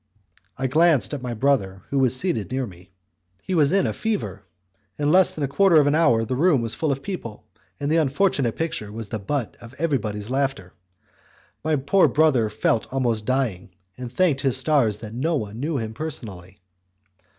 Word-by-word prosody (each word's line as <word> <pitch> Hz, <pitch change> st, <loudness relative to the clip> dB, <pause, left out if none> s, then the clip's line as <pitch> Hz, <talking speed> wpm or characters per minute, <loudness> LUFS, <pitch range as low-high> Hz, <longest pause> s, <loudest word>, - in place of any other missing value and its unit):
I 135 Hz, -, -2 dB
glanced 150 Hz, -, +3 dB
at 145 Hz, -, -4 dB
my 125 Hz, -2 st, -4 dB
brother, 105 Hz, -7 st, 0 dB
who 140 Hz, -, +1 dB
was 130 Hz, -2 st, +3 dB
seated 130 Hz, -, -1 dB
near 130 Hz, 0 st, -2 dB
me; 90 Hz, -3 st, -14 dB, 0.5 s
he 190 Hz, -, -4 dB
was 150 Hz, -4 st, +3 dB
in 195 Hz, 0 st, +3 dB
a -, -, -1 dB
fever. 105 Hz, -, -3 dB, 0.6 s
In 145 Hz, 0 st, +1 dB
less 185 Hz, +2 st, +5 dB
than 150 Hz, -, -5 dB
a -, -, +1 dB
quarter 170 Hz, +3 st, +4 dB
of 145 Hz, -, +4 dB
an 145 Hz, -, +2 dB
hour 120 Hz, -8 st, +3 dB
the 130 Hz, +3 st, -2 dB
room 145 Hz, -3 st, +3 dB
was 115 Hz, -1 st, -1 dB
full 145 Hz, +6 st, -1 dB
of 135 Hz, 0 st, -3 dB
people, 115 Hz, -, -6 dB, 0.3 s
and 145 Hz, +1 st, -2 dB
the 165 Hz, -, +3 dB
unfortunate 140 Hz, -, +1 dB
picture 135 Hz, -10 st, -4 dB
was 110 Hz, -1 st, -7 dB
the 110 Hz, -, -4 dB
butt 120 Hz, +4 st, -3 dB
of 120 Hz, +2 st, -12 dB
everybody's 115 Hz, -9 st, -2 dB
laughter. 135 Hz, -9 st, -2 dB, 0.9 s
My 155 Hz, 0 st, +1 dB
poor 145 Hz, +8 st, +3 dB
brother 140 Hz, -8 st, +2 dB
felt 110 Hz, +1 st, -1 dB
almost 120 Hz, -5 st, -1 dB
dying, 115 Hz, -9 st, -2 dB, 0.2 s
and 125 Hz, -1 st, -7 dB
thanked 150 Hz, -3 st, +1 dB
his 135 Hz, -3 st, +2 dB
stars 130 Hz, -7 st, +2 dB
that 110 Hz, 0 st, -9 dB
no 160 Hz, +8 st, -1 dB
one 110 Hz, -4 st, -4 dB
knew 150 Hz, +2 st, -2 dB
him 110 Hz, -2 st, -4 dB
personally. 100 Hz, -, -6 dB
130 Hz, 190 wpm, -23 LUFS, 110-155 Hz, 0.9 s, less